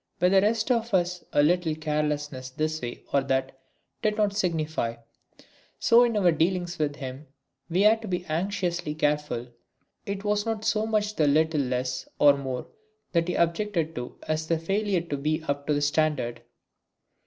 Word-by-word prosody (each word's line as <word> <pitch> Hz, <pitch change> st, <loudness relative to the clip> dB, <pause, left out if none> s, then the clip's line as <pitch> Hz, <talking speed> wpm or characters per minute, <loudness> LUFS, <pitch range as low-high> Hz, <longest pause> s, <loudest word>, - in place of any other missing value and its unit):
With 180 Hz, +1 st, +4 dB
the 195 Hz, -1 st, +6 dB
rest 220 Hz, +4 st, +1 dB
of 230 Hz, -3 st, +1 dB
us 180 Hz, 0 st, 0 dB
a 145 Hz, -, +4 dB
little 165 Hz, 0 st, +2 dB
carelessness 150 Hz, -3 st, -2 dB
this 155 Hz, +4 st, -2 dB
way 120 Hz, 0 st, -6 dB
or 140 Hz, -, +4 dB
that 135 Hz, 0 st, -1 dB, 0.4 s
did 210 Hz, 0 st, +1 dB
not 205 Hz, -2 st, +1 dB
signify; 155 Hz, -, -1 dB, 0.8 s
so 235 Hz, +1 st, +6 dB
in 235 Hz, -3 st, +1 dB
our 180 Hz, -4 st, +4 dB
dealings 175 Hz, +2 st, 0 dB
with 145 Hz, -2 st, 0 dB
him 135 Hz, +2 st, -7 dB, 0.4 s
we 175 Hz, +3 st, +2 dB
had 220 Hz, +1 st, +5 dB
to 220 Hz, -, -7 dB
be 180 Hz, -1 st, -2 dB
anxiously 170 Hz, -2 st, -2 dB
careful. 150 Hz, -5 st, -1 dB, 0.6 s
It 200 Hz, 0 st, -3 dB
was 210 Hz, 0 st, +1 dB
not 220 Hz, -1 st, -3 dB
so 215 Hz, +1 st, +1 dB
much 215 Hz, -1 st, 0 dB
the 150 Hz, -, +3 dB
little 155 Hz, +1 st, +3 dB
less 130 Hz, 0 st, -2 dB
or 145 Hz, -1 st, +6 dB
more 130 Hz, -2 st, -4 dB, 0.5 s
that 170 Hz, -1 st, +1 dB
he 180 Hz, -, -1 dB
objected 170 Hz, -1 st, 0 dB
to 125 Hz, -3 st, -6 dB
as 155 Hz, 0 st, -1 dB
the 165 Hz, -, +2 dB
failure 195 Hz, +2 st, 0 dB
to 160 Hz, -4 st, -4 dB
be 155 Hz, +3 st, -1 dB
up 140 Hz, -2 st, -3 dB
to 150 Hz, -, +2 dB
the 145 Hz, -, 0 dB
standard. 145 Hz, -5 st, 0 dB
160 Hz, 175 wpm, -26 LUFS, 145-195 Hz, 0.8 s, the